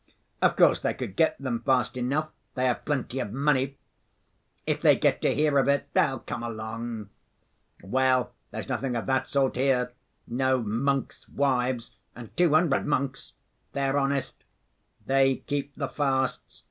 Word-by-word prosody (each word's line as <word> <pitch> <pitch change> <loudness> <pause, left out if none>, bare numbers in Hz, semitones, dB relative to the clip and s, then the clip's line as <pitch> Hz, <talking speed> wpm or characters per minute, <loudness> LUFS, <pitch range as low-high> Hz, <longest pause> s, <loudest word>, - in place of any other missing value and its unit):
Of - - +4
course - - +5
they - - -1
could 95 - -5
get 160 +4 +3
them 130 -4 -2
fast 130 -3 +1
enough, 140 +5 -1 0.2
they 130 - 0
have 125 -2 0
plenty 135 -3 -2
of 115 -6 -3
money. 135 +1 +1 0.9
If - - -1
they - - +6
get - - +1
to - - +2
hear 150 -1 +3
of 135 - +2
it 140 0 +1
they'll 135 - +3
come - - -5
along. 110 -1 -5 0.7
Well, 130 +4 +2 0.2
there's - - -6
nothing 130 -3 -2
of 115 - -2
that 130 0 0
sort 135 -3 +1
here, 125 -2 +2 0.3
no 130 +2 +1
'monks' 135 +6 -1
wives,' 130 -3 0 0.2
and 120 -2 -11
two 175 -2 +4
hundred 155 -3 +2
monks. 140 -2 -2 0.4
They're 140 0 +1
honest. 140 0 -2 0.6
They 135 0 +3
keep 145 -1 -3
the 140 - -2
fasts. 135 -2 -1
130 Hz, 155 wpm, -27 LUFS, 125-140 Hz, 0.9 s, they